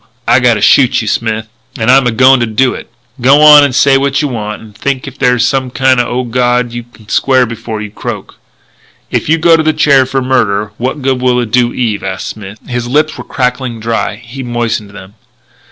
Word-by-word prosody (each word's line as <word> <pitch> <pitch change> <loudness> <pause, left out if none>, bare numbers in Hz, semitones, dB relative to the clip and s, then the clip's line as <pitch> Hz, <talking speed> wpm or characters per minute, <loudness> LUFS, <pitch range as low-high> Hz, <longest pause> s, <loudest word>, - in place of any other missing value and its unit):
I 120 +2 +4
gotta 120 -4 +2
shoot 125 +2 +3
you, - - -6
Smith. 110 0 -2 0.3
And 110 +1 +2
I'm 135 -1 +4
a - - +1
going 130 +3 +4
to 120 - -1
do 125 +4 +1
it. - - -10 0.3
G'wan 150 +3 +7
and 140 -3 0
say 135 0 +4
what 140 0 0
you 150 - -1
want... 105 -3 -5
if - - -12
you - - -20
think 140 +2 -4
there's 125 -1 +2
some 135 -1 -1
kind 130 0 +1
o' 120 +1 -1
god 120 0 0
you 120 0 -5
can 115 -2 -20
square 130 +3 +2
before 115 -2 -6
you 105 - -8
croak." - - -7 0.7
"If - - -2
you 165 - +3
go 165 +1 +4
to 165 - +1
the 155 0 +1
chair 135 -4 +3
for 135 0 -2
murder, 105 -5 0
what 130 +3 -3
good 130 -1 0
will 125 -1 +1
it 120 -3 -4
do 120 0 +2
Eve?" 115 -5 -2
asked 95 -1 -5
Smith. 105 -1 -9
His 120 -1 -4
lips 150 +5 0
were - - -8
crackling 125 -2 -3
dry; 115 -1 -2
he 120 +4 -10
moistened 120 -4 -3
them. 95 -1 -13
125 Hz, 215 wpm, -11 LUFS, 115-135 Hz, 0.7 s, G'wan